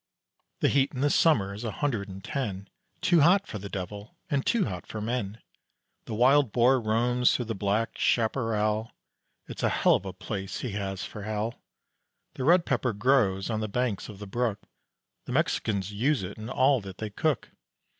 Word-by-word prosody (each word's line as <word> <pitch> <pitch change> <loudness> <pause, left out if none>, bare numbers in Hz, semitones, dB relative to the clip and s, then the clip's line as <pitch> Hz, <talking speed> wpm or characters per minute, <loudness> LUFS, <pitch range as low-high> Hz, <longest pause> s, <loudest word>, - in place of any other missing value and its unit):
The - - +4
heat 140 0 +2
in 130 - -3
the 145 0 +3
summer 110 -14 +3
is 105 +4 -7
a 115 - -2
hundred 115 -9 -2
and 95 0 -9
ten, 100 -9 -3 0.3
Too 170 -3 +4
hot 190 +6 +5
for 105 - -6
the 100 +1 -7
devil 100 +2 -7
and 140 -2 +1
too 230 -4 +2
hot 90 -5 -6
for 110 - -6
men. 110 -1 -3 0.7
The 110 - -5
wild 130 +2 +4
boar 125 +3 +4
roams 120 +3 +2
through 125 - -1
the 115 - -3
black 105 +3 -1
chaparral, 110 -2 +1 0.5
It's - - -7
a - - +2
hell - - +3
of 100 - 0
a - - -3
place 95 0 -5
he 125 - -3
has 95 -1 -3
for 105 - -8
a - - -7
hell. 110 +2 -3 0.7
The 130 - -5
red 170 +4 +5
pepper 125 -2 0
grows 105 -3 +2
on 110 - -1
the 110 - -2
banks 120 -2 -1
of 105 - -9
the 105 - -8
brook; 110 0 -2 0.6
The - - -5
Mexicans 100 -2 0
use 130 +3 +1
it 95 +2 -6
in 110 +2 -7
all 130 0 +3
that 95 -1 -9
they 110 -1 -5
cook. 150 +7 -1
110 Hz, 195 wpm, -28 LUFS, 100-130 Hz, 0.7 s, hot